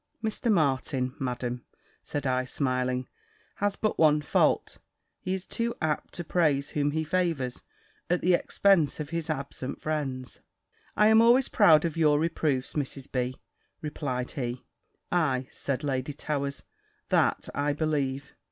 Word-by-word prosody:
"Mr. 220 +1 0
Martin, 135 -6 +1
Madam," 125 -1 -3 0.4
said 145 -1 -4
I, 130 -1 +1
smiling, 125 -1 -1 0.5
"has 205 0 0
but 215 - -1
one 150 -1 +5
fault: - - +1 0.4
he 185 +1 -2
is 190 0 -6
too 235 0 -2
apt 155 -2 -2
to 175 - -4
praise 150 -5 +1
whom 145 -1 0
he 160 +2 -1
favours, 155 -7 -1 0.5
at 180 0 +2
the 180 - +3
expense 175 -3 +3
of 150 +1 -5
his 165 -1 -3
absent 140 -3 -4
friends." 135 -5 -3 0.6
"I 210 - +5
am 220 0 +7
always 240 +3 +5
proud 165 -7 +6
of 165 -1 -2
your 150 -2 +4
reproofs, 155 -5 0
Mrs. 140 -2 -4
B.," 125 0 -1 0.4
replied 135 -5 -3
he. 125 -3 -4 0.5
"Ay," 135 -7 +1
said 135 0 -3
Lady 135 0 -2
Towers, 140 -1 -3 0.5
"that - - +2
I 145 +1 0
believe. 140 -3 -1
145 Hz, 145 wpm, -28 LUFS, 130-165 Hz, 0.6 s, am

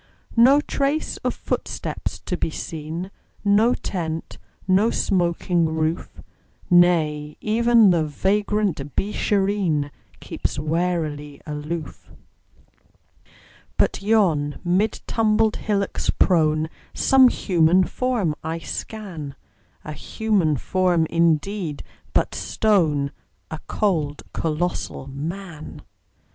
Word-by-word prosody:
No 255 +5 +6
trace 290 +1 -1
of - - -2
footsteps - - -4
to - - -3
be - - -1
seen, 160 +4 -6 0.3
No 210 +4 +4
tent, 165 -4 -4 0.3
no 195 +4 +4
smoking 175 -4 +1
roof; 160 +1 -2 0.5
Nay, 155 -4 +3
even 230 -1 +4
the 170 -2 +2
vagrant 190 -2 -1
Beeshareen 195 -7 0 0.3
Keeps - - -4
warily 155 -2 -2
aloof. 150 +1 -6 1.7
But - - +1
yon, 180 -9 +2
mid 190 +5 +1
tumbled 220 -1 +2
hillocks 200 -2 -1
prone, 155 -3 +2 0.3
Some 265 -1 +6
human 180 -5 +3
form 230 -6 -1
I 160 +1 -2
scan 165 -5 -6 0.5
A 150 - -6
human 190 -5 0
form, 180 +2 +1
indeed, 170 0 0 0.3
but - - +2
stone: 155 -10 +1 0.4
A 160 - -5
cold, 155 -8 -1
colossal 165 -2 -2
Man! 160 +4 -7
175 Hz, 95 wpm, -23 LUFS, 155-205 Hz, 1.7 s, No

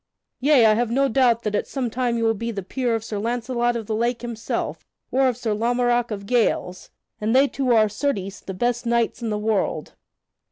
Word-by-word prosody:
Yea; 275 -3 +5
I 215 - +6
have 235 +1 0
no 275 +4 +2
doubt 240 -2 +2
that 210 - -2
at - - -1
some 265 -3 -2
time 240 -1 0
you 230 - -1
will 225 0 +3
be 230 +2 -4
the 200 -4 -4
peer 245 +4 -1
of 225 - -3
Sir 215 -2 -4
Launcelot 240 +2 -1
of 230 -2 -4
the 220 - -3
Lake 235 +2 -1
himself, 230 -2 -4 0.3
or 265 +1 +3
of 250 -2 0
Sir 225 -3 -1
Lamorak 240 +2 +1
of 200 -2 -5
Gales, 200 -5 0 0.3
and 220 +3 0
they 275 +2 +6
two 265 -2 -1
are, 220 -2 +5
certes, 205 -4 -3
the 190 - -7
best 240 +4 -1
knights 235 0 0
in 230 - -2
the 210 - -1
world. 210 -1 -1
235 Hz, 215 wpm, -23 LUFS, 215-245 Hz, 0.3 s, I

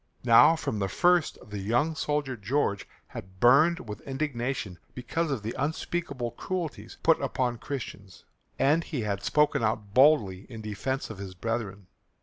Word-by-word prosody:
Now 120 +7 +7
from 110 -9 -3
the 100 - 0
first 175 - +2
the 105 -1 -6
young 120 +11 +1
soldier 150 -4 -2
George 105 -1 -1 0.2
had 95 0 -10
burned 145 - +4
with 105 -1 -7
indignation 130 - -3 0.2
because 155 +6 -2
of 130 -7 -2
the 110 - -3
unspeakable 140 -4 -2
cruelties 170 +5 -5
put 165 - +4
upon 125 -3 -1
Christians, 100 -9 -7 0.3
and 155 +5 +3
he 140 -6 -4
had 100 -2 -2
spoken 150 +3 +2
out 110 -2 -1
boldly 110 -9 +4
in 115 -3 -8
defence 110 +5 -3
of 105 - -9
his 95 -2 -7
brethren. 105 -2 -4
125 Hz, 150 wpm, -28 LUFS, 105-150 Hz, 0.3 s, Now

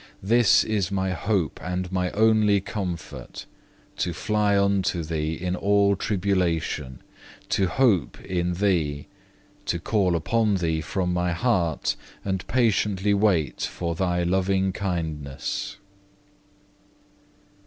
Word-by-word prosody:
This 115 +2 +5
is 100 -4 -1
my 95 -1 0
hope 90 -1 -1
and 90 0 -3
my 90 -1 0
only 110 -1 +4
comfort, 90 -4 -6 0.5
to 90 - -1
fly 105 +2 +1
unto 100 -3 +1
Thee 80 0 -2
in 90 +2 -2
all 100 +1 +3
tribulation, 90 -9 -1 0.5
to 95 - +2
hope 100 - +2
in 90 -1 -1
Thee, 85 -7 0 0.6
to 85 - 0
call 95 -1 +1
upon 105 +5 +1
Thee 80 -3 0
from 90 +3 -2
my 90 -1 0
heart 85 - 0 0.3
and 95 -2 -2
patiently 105 -4 +2
wait 100 -7 +1
for 85 -1 -2
Thy 90 0 0
loving 95 +1 +1
kindness. 80 -1 -3
95 Hz, 110 wpm, -25 LUFS, 85-100 Hz, 0.6 s, This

